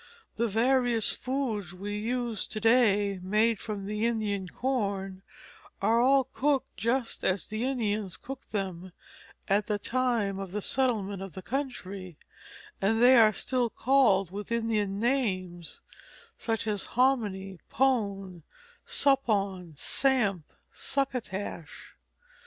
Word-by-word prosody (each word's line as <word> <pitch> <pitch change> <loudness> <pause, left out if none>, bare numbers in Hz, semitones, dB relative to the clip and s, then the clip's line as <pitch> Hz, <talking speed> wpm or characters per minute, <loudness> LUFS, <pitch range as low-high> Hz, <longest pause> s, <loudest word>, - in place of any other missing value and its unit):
The 235 +1 +1
various 240 +1 +2
foods 235 - -3
which 180 - -14
we 205 +1 -4
use 235 0 -2
to 215 - -5
day 210 -4 +3
made 215 +3 +2
from 205 -3 -5
Indian 210 -2 -1
corn 200 -6 -2 0.6
are 230 +1 +3
all 270 +2 +5
cooked 270 +1 -1
just 230 +4 -1
as 190 0 +1
the 215 +2 -4
Indians 215 -7 -1
cooked 270 0 -9
them 185 -3 -4 0.5
at 205 +2 +2
the 210 -2 0
time 230 -4 0
of 195 -2 -6
the 210 - -1
settlement 210 -6 0
of 195 -2 -7
the 190 - -8
country; 200 - -5 0.6
and 220 +3 +2
they 250 +2 +7
are 220 -3 +7
still 245 +3 -1
called 225 -9 +3
with 205 +3 -7
Indian 215 -4 0
names, 185 -9 -1 0.5
such 225 -2 -2
as 210 -3 -1
hominy, 205 -8 +1
pone, 200 -9 0 0.5
suppawn, 200 - +1
samp, 215 - 0 0.2
succotash. 220 - -4
215 Hz, 120 wpm, -29 LUFS, 195-245 Hz, 0.6 s, they